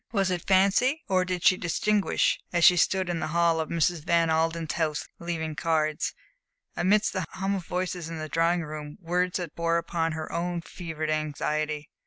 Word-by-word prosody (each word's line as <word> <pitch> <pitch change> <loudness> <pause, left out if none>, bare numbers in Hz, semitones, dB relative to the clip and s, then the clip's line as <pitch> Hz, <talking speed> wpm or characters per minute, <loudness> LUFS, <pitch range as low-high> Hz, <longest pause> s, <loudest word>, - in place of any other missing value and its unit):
Was 195 -4 +1
it 180 -1 -3
fancy, 200 +10 +3
or 185 -1 +2
did 180 -1 -3
she 185 - +5
distinguish, 200 +4 +1
as 175 -1 +1
she 180 - +8
stood 185 +2 +2
in 175 -2 -2
the - - -2
hall 170 -1 +3
of 160 - -2
Mrs. 170 -1 +1
Van 165 -1 +2
Alden's 165 0 0
house 155 -3 -1
leaving 160 -2 -3
cards, 155 +1 0 0.6
amidst 205 +4 +2
the 185 -4 -2
hum 195 +1 -1
of 185 -3 -4
voices 180 -2 -3
in 165 - -5
the 155 0 -5
drawing 165 +2 +1
room, 150 -1 -7
words 180 +1 0
that 175 -4 -5
bore 170 0 +1
upon 165 -1 -1
her 155 0 -5
own 170 0 -2
fevered 160 -3 -5
anxiety? 155 0 -2
170 Hz, 185 wpm, -27 LUFS, 160-180 Hz, 0.6 s, she